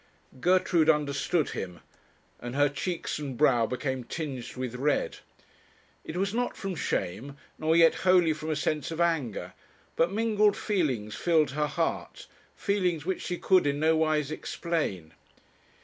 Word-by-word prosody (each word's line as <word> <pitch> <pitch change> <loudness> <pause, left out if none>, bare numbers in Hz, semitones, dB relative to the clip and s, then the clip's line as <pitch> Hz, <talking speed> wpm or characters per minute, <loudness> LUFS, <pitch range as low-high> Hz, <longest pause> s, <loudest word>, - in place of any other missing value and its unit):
Gertrude 180 -1 +3
understood 150 +1 +1
him, 90 -2 -5 0.6
and 120 +1 -6
her 145 0 +4
cheeks 170 +3 -3
and 140 -4 -5
brow 120 -6 +4
became 130 +1 -3
tinged 135 -3 -5
with 125 -2 -4
red. 140 +4 0 0.8
It 160 - -6
was 195 +2 0
not 245 +1 -1
from 195 -1 -4
shame, 135 - -3 0.2
nor 160 +1 +2
yet 165 -1 +6
wholly 180 -3 +4
from 155 +1 -6
a 155 - 0
sense 150 -1 -1
of 165 0 -5
anger, 160 -10 0 0.4
but 165 +2 +2
mingled 215 -1 +2
feelings 130 - -1
filled 160 -5 +2
her 150 +2 0
heart; 160 +3 -3 0.3
feelings 180 -7 0
which 190 +1 -2
she 180 - -3
could 185 -4 +3
in 145 0 0
nowise 155 -2 +2
explain. 150 - -3
155 Hz, 145 wpm, -28 LUFS, 135-175 Hz, 0.8 s, yet